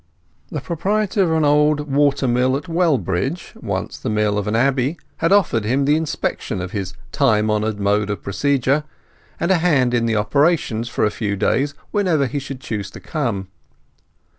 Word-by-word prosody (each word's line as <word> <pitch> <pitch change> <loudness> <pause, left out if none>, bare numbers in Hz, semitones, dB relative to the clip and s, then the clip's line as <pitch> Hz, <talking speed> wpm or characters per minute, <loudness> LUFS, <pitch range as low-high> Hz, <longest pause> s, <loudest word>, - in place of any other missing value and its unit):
The 150 - -4
proprietor 200 - 0
of 180 - +3
a - - +1
large 160 -1 +2
old 150 +1 +4
water 140 -1 +1
mill 125 +2 +2
at 145 - -7
Wellbridge—once 150 - -1
the - - -3
mill 105 -1 +1
of 100 - -4
an 105 - 0
Abbey—had 135 +7 0
offered 180 - +3
him 130 +6 +1
the 145 +2 +4
inspection 160 -10 -2
of 90 0 -5
his 95 -2 -4 0.2
time 110 -6 +2
honoured 105 0 -1
mode 100 +1 +1
of 100 -4 -4
procedure, 140 +6 +1 0.6
and 180 - +1
a 185 - +4
hand 140 -8 +2
in 115 -1 +2
the 115 - +1
operations 120 0 +1
for - - 0
a 105 - +1
few 105 -2 -2
days, 140 +8 0 0.2
whenever 180 -9 +2
he 140 +3 -2
should 135 -1 -7
choose 105 -4 -4
to - - -11
come. 115 - -3
135 Hz, 175 wpm, -20 LUFS, 105-150 Hz, 0.6 s, old